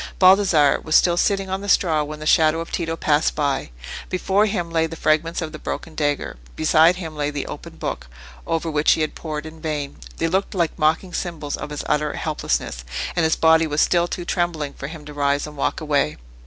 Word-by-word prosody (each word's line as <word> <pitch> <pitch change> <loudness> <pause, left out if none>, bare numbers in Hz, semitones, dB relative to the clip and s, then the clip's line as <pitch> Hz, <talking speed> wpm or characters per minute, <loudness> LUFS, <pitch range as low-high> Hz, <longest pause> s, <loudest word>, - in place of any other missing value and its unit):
Baldassarre 185 -6 +5
was 155 - -1
still 175 -1 +5
sitting 195 +2 +1
on 190 +1 -2
the 200 - -5
straw 160 -6 +3
when 150 +1 -6
the 155 - -7
shadow 155 +1 +4
of 165 - -6
Tito 165 -2 -2
passed 150 -1 +1
by. 140 -3 -1 0.4
Before 195 +3 +2
him 175 -5 -2
lay 165 -1 +2
the 165 - -8
fragments 160 +2 +1
of 155 - -5
the 155 - -8
broken 165 - -5
dagger; 145 - -1 0.2
beside 160 +2 +4
him 165 -4 -7
lay 145 -1 -1
the 145 -1 -4
open - - -8
book, - - -5 0.4
over 165 0 -1
which 150 0 +4
he - - -1
had 155 - -1
pored 155 -2 -5
in 160 0 -10
vain. 150 -3 -3 0.2
They 165 - 0
looked 190 +4 -1
like 170 -3 0
mocking 160 +4 +1
symbols 155 -5 -3
of - - -7
his 150 -1 -5
utter 150 0 0
helplessness; - - -2 0.3
and 170 - +2
his 160 0 +3
body 160 0 +4
was 150 0 -1
still 175 -1 +3
too 175 0 -5
trembling 170 -6 -1
for 135 - -7
him 155 -1 -9
to 150 - -9
rise 145 0 +1
and 150 0 -10
walk 140 - -1
away. 145 - 0
160 Hz, 215 wpm, -22 LUFS, 150-170 Hz, 0.4 s, Baldassarre